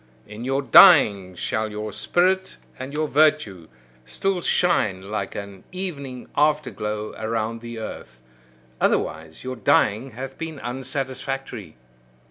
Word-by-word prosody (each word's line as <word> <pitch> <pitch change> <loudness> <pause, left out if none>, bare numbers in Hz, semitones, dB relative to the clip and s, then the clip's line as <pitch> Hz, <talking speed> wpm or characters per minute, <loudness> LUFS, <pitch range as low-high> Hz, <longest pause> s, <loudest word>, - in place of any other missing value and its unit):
In 105 +2 -9
your 135 +2 0
dying 105 - +7
shall 110 +5 -2
your 105 0 -5
spirit 190 +2 +1 0.2
and 130 +2 -6
your 155 +1 -1
virtue 150 - +2 0.4
still 190 - -2
shine 105 - +1
like 100 -2 -3
an 100 -2 -8
evening 140 -9 -5
after 150 -2 +2
glow 105 +1 -4
around 115 +1 -2
the 120 0 -8
earth: 65 - -8 0.6
otherwise 80 0 -1
your 130 0 -4
dying 110 +2 +2
hath 135 +3 -8
been 165 -2 -5
unsatisfactory. 130 - -5
125 Hz, 120 wpm, -23 LUFS, 105-150 Hz, 0.6 s, dying